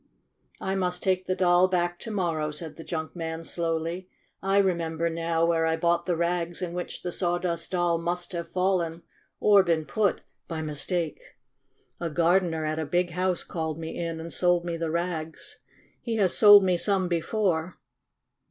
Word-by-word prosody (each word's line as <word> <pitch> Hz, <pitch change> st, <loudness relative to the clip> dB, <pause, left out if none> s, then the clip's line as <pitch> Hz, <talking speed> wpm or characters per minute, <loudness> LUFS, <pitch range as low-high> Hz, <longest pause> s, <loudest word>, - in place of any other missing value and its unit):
"I 190 Hz, -, -2 dB
must 180 Hz, -2 st, -1 dB
take 185 Hz, -1 st, +1 dB
the 185 Hz, -, 0 dB
Doll 180 Hz, 0 st, +4 dB
back 175 Hz, -1 st, -1 dB
to 230 Hz, -, -7 dB
morrow," 170 Hz, -7 st, -1 dB
said 155 Hz, +1 st, -7 dB
the 165 Hz, -, -9 dB
junk 160 Hz, 0 st, -5 dB
man 165 Hz, -1 st, -4 dB
slowly. 165 Hz, +2 st, -3 dB, 0.3 s
"I 195 Hz, +1 st, +1 dB
remember 170 Hz, -4 st, +1 dB
now 165 Hz, 0 st, 0 dB
where 165 Hz, -1 st, +2 dB
I 160 Hz, 0 st, +1 dB
bought 170 Hz, +1 st, +1 dB
the 180 Hz, -, 0 dB
rags 170 Hz, 0 st, -1 dB
in 175 Hz, -2 st, -3 dB
which 180 Hz, 0 st, -5 dB
the 175 Hz, -, -3 dB
Sawdust 175 Hz, -1 st, -1 dB
Doll 175 Hz, -2 st, +1 dB
must 175 Hz, +1 st, -3 dB
have 170 Hz, -2 st, -5 dB
fallen 180 Hz, -3 st, 0 dB, 0.4 s
or 205 Hz, -1 st, +6 dB
been 165 Hz, -4 st, 0 dB
put 210 Hz, +1 st, 0 dB, 0.3 s
by 160 Hz, -2 st, -4 dB
mistake. 155 Hz, +2 st, -1 dB, 0.8 s
A 170 Hz, -, -2 dB
gardener 170 Hz, 0 st, +2 dB
at 155 Hz, +1 st, -2 dB
a 160 Hz, -, -2 dB
big 175 Hz, +3 st, +1 dB
house 180 Hz, +1 st, 0 dB
called 160 Hz, -2 st, -4 dB
me 160 Hz, 0 st, -6 dB
in 165 Hz, -1 st, -3 dB
and 165 Hz, +1 st, -7 dB
sold 175 Hz, -1 st, +2 dB
me 170 Hz, -1 st, -2 dB
the 165 Hz, -1 st, -2 dB
rags. 165 Hz, -1 st, -4 dB, 0.4 s
He 230 Hz, -2 st, -2 dB
has 195 Hz, -5 st, +2 dB
sold 205 Hz, -2 st, +9 dB
me 180 Hz, -2 st, +2 dB
some 190 Hz, 0 st, +1 dB
before. 175 Hz, 0 st, -1 dB
170 Hz, 175 wpm, -27 LUFS, 165-180 Hz, 0.8 s, sold